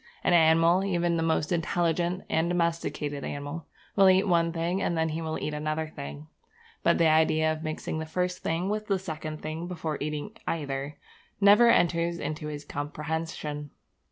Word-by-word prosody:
An - - +3
animal, 165 +2 +5
even 175 -3 +1
the 165 - 0
most 160 -1 0
intelligent 175 +1 0
and 160 +1 +1
domesticated 165 -4 -1
animal, 145 +3 -5 0.3
will 195 -1 +7
eat 190 +2 +4
one 170 -2 +3
thing 170 +3 -1
and 170 - 0
then 160 0 +1
he 160 +1 -3
will 160 -1 -3
eat 150 - -3
another 155 +1 -2
thing; 70 +1 -7 0.6
but - - +3
the 170 - +3
idea 155 0 +3
of 155 - -7
mixing 155 0 -4
the 160 - -5
first 180 +2 -1
thing 165 +3 -1
with 210 +1 -2
the 195 - +2
second 155 -4 -6
thing 160 +2 -4
before 160 -4 -4
eating 150 +5 -3 0.2
either 140 -2 -3 0.4
never 210 +4 +7
enters 170 -5 +2
into 155 -2 -4
his 150 -1 -6
comprehension. 150 0 -4
160 Hz, 170 wpm, -28 LUFS, 155-175 Hz, 0.6 s, will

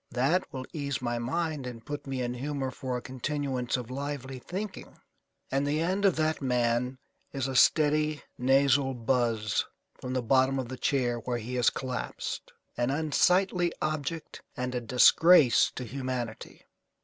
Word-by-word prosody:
That 145 +9 +1
will 130 -1 -5
ease 140 -4 -2
my 120 -1 -2
mind 150 +2 -2
and 115 -2 -8
put 145 -1 -6
me 130 -2 -2
in 120 0 -2
humour 135 +1 -3
for 130 -1 -4
a 125 - -7
continuance 130 -1 -2
of 125 -1 -7
lively 135 -1 -5
thinking." 190 +9 -6 0.5
And 140 +1 +1
the 150 +2 +1
end 185 +5 0
of 190 - +4
that 155 -1 0
man 125 0 0 0.3
is 135 -1 -2
a 135 - -4
steady 150 +2 +3
nasal 135 +1 +3
buzz 115 -3 +1 0.3
from 125 - -6
the 130 -1 -1
bottom 130 +3 +3
of 130 -3 -3
the 130 - -5
chair 125 -3 0
where 120 +1 -2
he 120 +2 -6
has 125 -2 +4
collapsed, 130 -1 -5 0.2
an 120 +1 0
unsightly 175 +5 +2
object 155 +1 -3 0.2
and 125 0 -2
a 125 - -1
disgrace 125 +4 +6
to 125 - -4
humanity. 125 -2 -5
130 Hz, 160 wpm, -29 LUFS, 125-150 Hz, 0.5 s, disgrace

